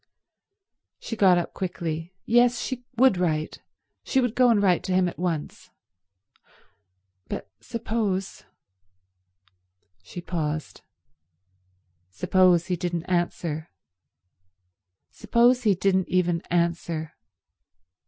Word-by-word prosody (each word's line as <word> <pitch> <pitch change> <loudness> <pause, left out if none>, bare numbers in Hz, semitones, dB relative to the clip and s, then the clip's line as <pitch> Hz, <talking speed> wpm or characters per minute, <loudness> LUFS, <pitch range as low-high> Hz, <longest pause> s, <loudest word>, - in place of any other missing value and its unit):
She 225 - -6
got 190 -4 +5
up 175 - -3
quickly. 170 -1 -4
Yes, 240 +1 +3
she 250 -1 -5
would 255 -5 +5
write. 155 -3 -1 0.4
She 265 - +1
would 245 -3 0
go 250 0 +4
and 225 -3 +4
write 185 -4 +3
to 185 - 0
him 185 -1 +3
at 175 - -7
once. 170 -4 -4 1.6
But - - -5
suppose— 210 - -3 1.6
She - - -9
paused. 155 -3 -4 1.3
Suppose 175 - +3
he 180 - -1
didn't 175 -1 -3
answer. 175 -3 -2 1.4
Suppose 245 +1 +2
he 205 -3 +4
didn't 190 0 +1
even 175 -2 +1
answer. 170 -2 -1
180 Hz, 100 wpm, -25 LUFS, 170-210 Hz, 1.6 s, got